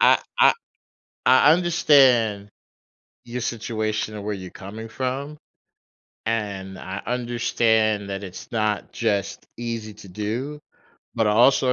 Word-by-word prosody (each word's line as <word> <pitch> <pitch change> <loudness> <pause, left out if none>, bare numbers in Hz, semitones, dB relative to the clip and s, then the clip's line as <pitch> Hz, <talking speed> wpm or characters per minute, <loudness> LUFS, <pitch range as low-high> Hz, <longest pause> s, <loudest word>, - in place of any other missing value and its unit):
I - - +6 0.2
I - - +8 0.7
I 150 - +7
understand 135 - +4 0.7
your 120 +1 -5
situation 110 -2 -2
and 105 - -7
where 105 0 -2
you're 95 -2 -8
coming 110 +4 -9
from, 135 +5 -4 0.9
and 100 -4 -3
I 95 +2 -6
understand 115 -3 +1
that 100 +1 -4
it's 95 +6 -10
not 110 -2 -1
just 100 -4 -1
easy 115 -2 -5
to 100 -1 -13
do, 115 +10 -4 0.5
but 110 - +1
I - - +3
also 125 +3 +4
110 Hz, 125 wpm, -23 LUFS, 105-125 Hz, 0.9 s, I